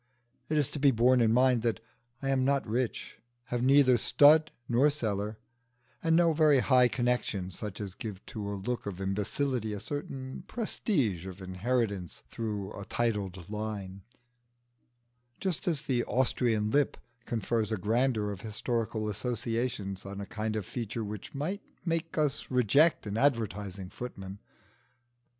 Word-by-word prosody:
It 155 - +1
is 145 -3 +2
to 150 - -4
be 140 0 +6
borne 125 +1 +4
in 110 -1 +4
mind 125 0 +4
that 115 -1 0 0.4
I 135 - 0
am 130 -1 +2
not 140 +1 +2
rich, 120 +2 -2 0.3
have 120 - 0
neither 130 -1 +5
stud 155 +5 +6 0.2
nor 125 +5 +4
cellar, 105 -6 -2 0.6
and 165 -2 +3
no 170 -1 +5
very 150 -2 +5
high 125 -1 +5
connections 120 -7 -1
such 105 -3 -5
as 100 -3 -5
give 100 -3 -7
to 105 -2 -5
a 100 - -3
look 120 +3 -3
of 95 -2 -5
imbecility 105 +4 -1
a 105 - -4
certain 135 0 -5
prestige 135 - -1
of 95 0 -8
inheritance 100 0 -2
through 105 -4 -3
a 100 - -7
titled 100 -5 -2
line; 105 -2 -5 1.4
just 185 -4 -2
as 160 -5 +1
"the 125 -3 +1
Austrian 120 -4 +1
lip" 145 +1 +2 0.3
confers 115 -1 -1
a 110 - +1
grandeur 110 +1 +1
of 100 -1 -7
historical 110 0 -2
associations 115 -2 -2
on 100 +1 -7
a 100 - -4
kind 110 +1 -3
of 105 -3 -2
feature 115 0 -4
which 105 +4 -7
might 180 +9 -2 0.2
make 165 -1 -1
us 150 -3 0
reject 130 +6 +4
an 105 +1 -3
advertising 105 -7 0
footman. 100 -5 -7
115 Hz, 150 wpm, -30 LUFS, 100-130 Hz, 1.4 s, be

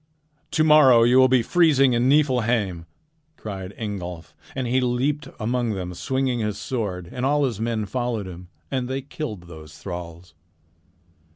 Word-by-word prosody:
"To 155 - +1
morrow 145 -7 +7
you 125 +2 +5
will 130 - +7
be 130 -2 +3
freezing 140 -5 +4
in 120 +2 +2
Niflheim," 115 - +1 0.5
cried 95 -3 -6
Ingolf, 90 -6 -6 0.2
and 130 -1 -2
he 130 +2 +1
leaped 135 +4 0
among 120 -1 -1
them 90 -1 -5
swinging 130 +5 -1
his 105 -2 -2
sword, 105 -6 -4
and 125 - -5
all 145 +2 +2
his 115 -6 -3
men 110 -1 -1
followed 120 -2 -2
him, 90 -1 -10 0.2
and 130 -2 -1
they 135 +1 -3
killed 125 - -6
those 80 -3 -12
thralls. 85 -2 -8
120 Hz, 155 wpm, -23 LUFS, 95-130 Hz, 0.5 s, morrow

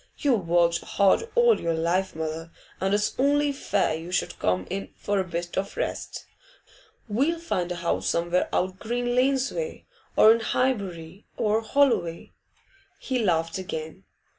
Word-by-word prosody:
You've 235 - +1
worked 170 0 +3
hard 200 - +2
all 480 -1 +5
your 165 -1 0
life, 175 +3 0
mother, 160 +1 -4 0.3
and 190 +1 0
it's 210 0 0
only 290 +2 +3
fair 205 - 0
you 165 +3 -6
should 180 - -1
come 90 0 0
in 195 +1 -4
for 205 -1 -1
a - - +1
bit 175 -1 -5
of 195 - -5
rest. - - -4 0.8
We'll 280 +11 +1
find 180 - -2
a - - -2
house 170 -1 -1
somewhere 170 +2 +1
out 185 +1 -1
Green 245 +2 -2
Lanes 265 +1 +2
way, 480 -1 -5 0.3
or 220 - +8
in 230 - 0
Highbury 195 -8 -2
or 215 +1 +1
Holloway.' 225 -9 +1 0.7
He 260 -2 -2
laughed 165 -4 0
again. 155 - -6
190 Hz, 155 wpm, -26 LUFS, 170-250 Hz, 0.8 s, or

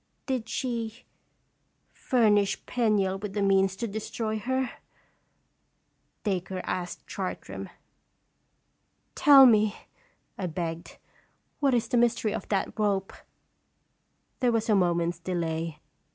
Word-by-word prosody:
" - - -46
Did 250 -4 -2
she 235 -2 -3 0.9
fur 245 -4 +2
nish 205 -1 +1
Penniel 205 -5 +1
with 205 -1 -6
the 205 - -1
means 195 -1 +3
to 230 +4 -3
destroy 220 +1 -3
her?" 260 +3 -1 1.5
Dacre 190 -2 -2
asked 180 -1 -4
Chartram. - - -5 0.7
" - - -46 0.3
Tell 280 -2 +8
me," 215 -3 +4 0.6
I 185 - -1
begged, 165 0 -5 0.3
" - - -44
what 275 -4 +3
is 235 -1 0
the 245 - +1
mystery 230 -3 +2
of - - -5
that 200 +2 -1
rope?" 200 -2 0 1.3
There 250 -2 +3
was 225 -1 0
a - - +5
moment's 175 -2 +1
delay. 165 -3 -3
210 Hz, 125 wpm, -27 LUFS, 185-235 Hz, 1.5 s, Tell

